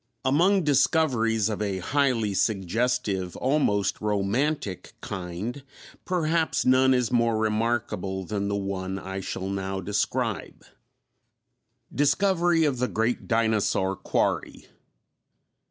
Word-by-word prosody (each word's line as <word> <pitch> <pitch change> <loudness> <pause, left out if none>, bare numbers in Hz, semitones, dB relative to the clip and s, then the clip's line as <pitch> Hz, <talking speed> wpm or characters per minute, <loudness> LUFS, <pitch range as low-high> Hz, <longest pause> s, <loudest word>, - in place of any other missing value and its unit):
Among 175 +8 +3
discoveries 135 - +2
of 105 -1 -3
a 100 -2 -1
highly 115 0 +1
suggestive, 100 -1 0
almost 125 -8 +1
romantic 105 - -1
kind, 95 +9 -5 0.4
perhaps 165 -2 0
none 130 +1 +5
is 125 -2 0
more 115 -2 +2
remarkable 110 -3 -1
than 100 +1 -3
the 100 - -1
one 95 -1 -3
I 95 0 -5
shall 95 0 -4
now 95 0 -3
describe. 100 +2 -2 1.3
_Discovery 170 +2 +2
of 130 -4 -2
the 125 - +1
Great 115 +1 -1
Dinosaur 110 -4 +1
Quarry. - - -2
110 Hz, 105 wpm, -26 LUFS, 100-135 Hz, 1.3 s, none